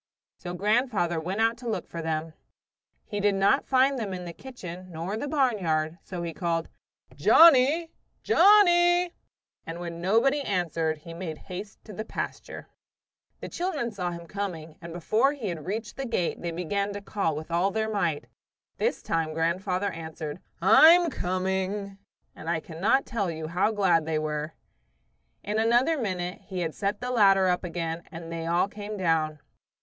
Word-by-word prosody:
So 175 0 -6
grandfather 205 -4 +1
went 185 +7 -2
out 230 +1 +2
to 240 -1 -5
look 220 - -3
for 170 - -6
them. 160 0 -3 0.7
He 205 - -4
did 205 0 +2
not 195 +8 +3
find 265 0 +3
them 200 -4 -3
in 180 -1 -7
the 170 - -7
kitchen 185 -7 -9
nor 170 +5 -4
the 255 +6 -3
barnyard, 185 - 0
so 180 -2 -6
he 165 -1 -4
called, 165 -1 -2 0.5
"Johnnie! 320 +1 +6 0.3
Johnnie!" 350 -3 +5 0.5
and 165 +1 -7
when 170 -1 -6
nobody 230 +10 +3
answered 165 - -1
he 165 - -8
made 165 -2 -5
haste 195 +6 -9
to 215 - -10
the 215 - -4
pasture. - - -6 0.7
The - - -5
children 320 -10 -2
saw 180 -4 -3
him 170 -1 -7
coming, 165 -4 -5
and 170 0 -8
long - - -8
before 235 - +2
he 245 -9 -4
had 165 -3 -6
reached 210 +2 -4
the 270 -1 -3
gate 185 -7 -1
they 175 - -3
began 200 +4 -2
to 205 - -6
call 195 -6 -1
with 155 +2 -7
all 175 +3 +2
their 220 +2 -1
might. 175 -8 -1 0.5
This - - -1
time 160 -1 -1
grandfather 185 +4 0
answered, 160 -1 -6 0.2
"I'm 335 +1 +7
coming!" 190 +2 -2 0.4
and 160 - -7
I 170 -1 +1
cannot 175 +12 0
tell 205 -6 -2
you 160 -1 -5
how 180 +5 +2
glad 180 -7 +2
they 160 -1 0
were. 155 0 -3 0.9
In 210 +2 -1
another 240 +8 +3
minute 185 - -3
he 185 -3 -4
had 160 -2 -2
set 200 +1 -2
the 250 0 -3
ladder 195 -5 +5
up 180 0 +1
again 165 -1 -3
and 165 0 -8
they 165 0 -4
all 175 +3 +2
came 210 +1 -7
down. 160 -4 +1
190 Hz, 170 wpm, -27 LUFS, 165-225 Hz, 0.9 s, I'm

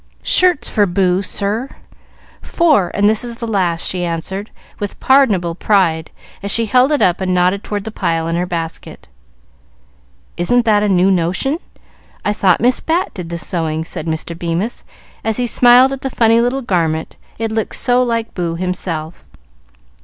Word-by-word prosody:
"Shirts 365 -4 +3
for 205 -2 +1
Boo, 180 0 +1
sir. 210 +6 -2 0.7
Four, 300 - +2
and 205 0 +3
this 215 +1 +2
is 235 -1 -7
the 235 - -5
last," 185 -7 0
she 180 -1 -2
answered, 175 +5 -4 0.3
with 205 -1 -5
pardonable 215 -11 +3
pride, 165 -4 +1 0.3
as 200 - -4
she 230 +3 +2
held 250 +6 +3
it 295 - +2
up 180 +1 +2
and 185 -1 0
nodded 180 +3 +1
toward 205 -1 -4
the 220 - -6
pile 165 -5 -1
in 165 - -1
her 175 +1 -1
basket. 165 - -6 1.3
"Isn't 240 +8 +2
that 210 -2 +3
a 210 - +1
new 190 0 +3
notion? 185 - 0 0.7
I 210 - +1
thought 190 -4 +2
Miss 250 +2 +2
Bat 340 +3 -1
did 180 -4 -7
the 170 - -4
sewing," 160 -2 -2
said 165 - -5
Mr. 160 +1 -4
Bemis, 170 +6 -3 0.4
as 220 -1 -1
he 250 - 0
smiled 245 +3 +5
at 270 - -6
the 270 - -3
funny 230 -2 +3
little 255 +3 -1
garment, 165 -6 -1 0.2
it 225 -1 -3
looked 220 -1 -2
so 250 0 +2
like 230 -2 -1
Boo 170 -2 -3
himself. 175 -2 -4
200 Hz, 170 wpm, -17 LUFS, 175-235 Hz, 1.3 s, smiled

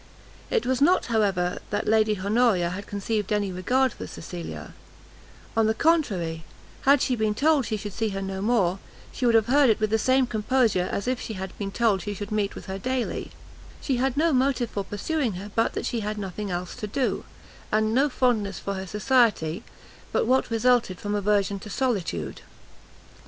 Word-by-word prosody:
It 470 -3 +1
was 260 +1 0
not, 355 +6 +4
however, 195 -5 +1
that 205 - -2
Lady 215 -2 +3
Honoria 200 -3 +2
had 200 +3 -6
conceived 205 0 -2
any 205 -2 +1
regard 250 +8 +1
for - - -8
Cecilia; 170 +1 -8 0.8
on 225 -1 +3
the 220 - +1
contrary, 195 - +1 0.4
had 280 0 +5
she 255 - +1
been 215 -2 0
told 295 -1 +3
she 215 - -1
should 205 -1 -6
see 225 +1 -1
her 195 -1 -4
no 190 0 -4
more, 200 -4 +2 0.3
she 250 - -1
would 230 - +4
have 220 -2 +5
heard 275 +2 +4
it 220 - +3
with 215 -1 0
the 220 - +3
same 260 +3 +3
composure 220 -4 +1
as 200 - -3
if 255 -1 0
she 220 - -5
had 190 -1 -6
been 200 -1 -3
told 215 -4 +2
she 205 +1 -4
should 205 +2 -6
meet 210 -1 -1
with - - -9
her 190 0 -5
daily; 255 +3 -2 0.5
she 265 -4 -1
had 265 +1 0
no 325 +1 +3
motive 255 -2 +1
for 200 - -2
pursuing 235 +5 -2
her 195 +3 -7
but 225 - +1
that - - -3
she 235 - -1
had 210 0 -3
nothing 200 +1 -4
else 180 0 -4
to 210 - -4
do, 255 +5 -1 0.5
and 215 +1 +2
no 275 +4 +3
fondness 225 -7 +1
for 200 - -4
her 190 0 -5
society 210 -6 +2 0.5
but, - - +1
what 260 +3 +2
resulted 230 -4 +2
from 205 0 -3
aversion 200 -1 +1
to 210 - -10
solitude. 235 -6 -2
215 Hz, 195 wpm, -25 LUFS, 195-250 Hz, 0.8 s, had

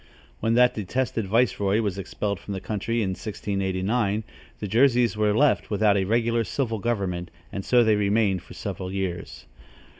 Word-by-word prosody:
When 115 +1 +1
that 125 0 +5
detested 110 +1 -2
viceroy 105 -2 +2
was 100 -3 -2
expelled 100 0 -3
from 100 - -6
the - - -3
country, 110 +3 -2
in 95 - -1
1689, 100 +2 -1 0.4
the 105 - -4
Jerseys 120 +1 +3
were 105 0 +2
left 145 0 +3
without 105 -1 +3
a 95 -1 +1
regular 115 +2 +1
civil 115 -2 -2
government, 95 -6 -2 0.2
and 100 - -4
so 120 +2 +4
they 110 -2 +4
remained 100 -2 +2
for - - -13
several 95 0 -5
years. 95 -2 -4
105 Hz, 160 wpm, -25 LUFS, 95-115 Hz, 0.4 s, that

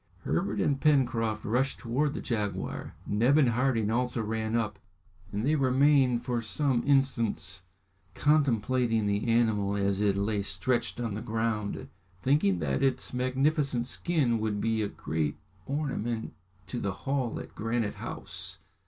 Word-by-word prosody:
Herbert - - -1
and 140 -2 +1
Pencroft 120 -7 +2
rushed 130 +5 +1
towards 140 +5 -1
the - - -3
jaguar. 105 -4 -3
Neb 120 +8 +3
and 140 -5 +5
Harding 115 -3 +1
also 125 0 0
ran 110 +1 -2
up, 110 -4 -1 0.5
and 105 +3 -2
they 150 - +3
remained 135 -3 +3
for 120 -2 0
some 125 +2 0
instants 135 -9 +1 0.5
contemplating 125 -6 +2
the 100 +2 0
animal 110 -4 +2
as 100 0 +1
it 100 -2 +2
lay 100 +1 0
stretched 110 +6 -1
on 115 -3 -2
the 105 - -4
ground, 110 -2 -2 0.3
thinking 130 - +2
that 70 -5 -1
its 135 -1 0
magnificent 130 0 +1
skin 130 -6 0
would 105 -1 -1
be 110 +1 +1
a 105 - 0
great 80 -6 -2 0.3
ornament 135 -6 -2 0.3
to 120 +6 -4
the 100 -4 -2
hall 135 -4 -1
at - - -9
Granite 115 -1 -1
House. - - -5
115 Hz, 145 wpm, -29 LUFS, 105-135 Hz, 0.5 s, and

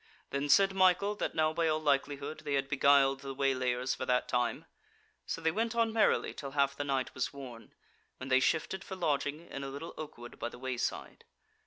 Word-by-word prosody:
Then 140 +1 -1
said 195 +5 +5
Michael 190 +2 +3
that - - -2
now 155 0 +2
by 165 0 +1
all 155 0 +1
likelihood 145 0 -1
they 145 -2 -2
had 135 0 0
beguiled 140 -1 +4
the 135 -1 -7
waylayers 130 -2 0
for 140 - -5
that 125 0 +2
time; 120 -1 -1 0.6
so - - -3
they 160 0 +2
went 225 +5 -1
on 230 -1 +2
merrily 220 -1 +2
till 140 -2 -7
half 140 0 +3
the 145 - -3
night 135 -2 -1
was 130 - -2
worn, 130 -5 -10 0.4
when 130 - -7
they 130 0 +5
shifted 165 +7 0
for 190 - -7
lodging 150 -3 -1
in 140 - -7
a 135 - -4
little 145 +5 -7
oak 155 -1 -7
wood 120 0 -11
by 120 - -2
the - - -12
wayside. 130 -1 -4
140 Hz, 205 wpm, -32 LUFS, 135-160 Hz, 0.6 s, said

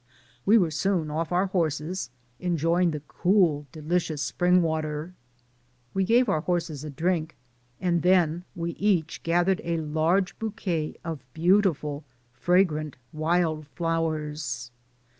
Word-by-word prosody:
We 220 +3 +7
were 175 -7 +2
soon 160 -1 0
off 160 +2 -2
our 180 +2 +2
horses, 170 -3 -1 0.3
enjoying 170 0 +2
the 150 -2 -4
cool, 175 -6 +2
delicious 155 -1 -1
spring 180 +6 +3
water. 155 +1 -2 0.8
We 195 0 +1
gave 240 +4 +4
our 155 - +1
horses 165 -4 -2
a 155 - -5
drink, 160 +2 -1 0.4
and 175 -2 +1
then 175 -1 +3
we 170 -1 -2
each 175 -5 0
gathered 175 +3 +2
a 170 0 -1
large 160 +5 0
bouquet 200 -8 -2
of 160 -5 -5
beautiful, 160 -5 +2 0.3
fragrant 155 -1 +1 0.2
wild 155 -1 0
flowers. 150 -5 -2
165 Hz, 120 wpm, -26 LUFS, 155-180 Hz, 0.8 s, We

